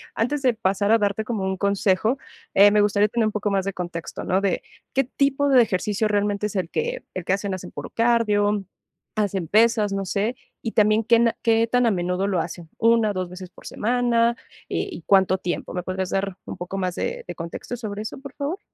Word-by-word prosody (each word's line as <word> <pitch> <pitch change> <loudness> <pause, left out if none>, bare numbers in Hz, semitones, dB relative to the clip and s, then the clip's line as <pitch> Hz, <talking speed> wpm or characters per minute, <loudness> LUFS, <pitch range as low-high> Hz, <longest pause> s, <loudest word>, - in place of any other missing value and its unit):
Antes 270 +6 0
de 250 -2 +4
pasar 200 -1 0
a 225 - +7
darte 205 +1 0
como 215 -3 -3
un 190 0 -1
consejo, 200 +4 +1 0.4
eh, 200 +1 +8
me 210 0 +4
gustaría 205 0 +3
tener 235 -1 +1
un - - -1
poco 210 0 -1
más 195 -1 +1
de 195 - -2
contexto, 175 -2 -5
¿no? 185 +2 +1
De, 195 -2 0 0.3
¿qué 270 +1 +3
tipo 280 +2 +1
de 260 -2 +7
ejercicio 210 +2 0
realmente 205 0 0
es 210 - -9
el 180 -3 -1
que - - -2
el 185 - -4
que - - +1
hacen? 200 0 -2
¿Hacen 180 -1 -9
puro - - -7
cardio, 210 -3 +2 0.5
hacen 195 -5 -1
pesas? 215 0 +3
No 195 -1 -2
sé. 210 +7 -1 0.3
Y 225 - -4
también, 215 0 +4
¿qué 230 0 +5
na 235 -1 +3
qué 230 -1 +3
tan 245 0 +2
a - - +4
menudo 180 +1 0
lo 185 -3 +1
hacen? 165 0 -5
1, 230 -2 +3
2 185 -1 -3
veces 180 0 -9
por 190 - -18
semana, 235 0 +1 0.3
eh, - - -1
¿y 175 - -7
cuánto 190 -1 +4
tiempo? 175 -1 -4
¿Me 180 - -2
podrías 185 0 -3
dar 195 -1 -1
un - - -7
poco 180 +2 -5
más 185 -2 -1
de - - -3
de 175 - -6
contexto 170 +8 -6
sobre 210 -2 -5
eso, 220 - -6
por 275 -1 -10
favor? 305 +7 -3
205 Hz, 220 wpm, -23 LUFS, 190-230 Hz, 0.5 s, eh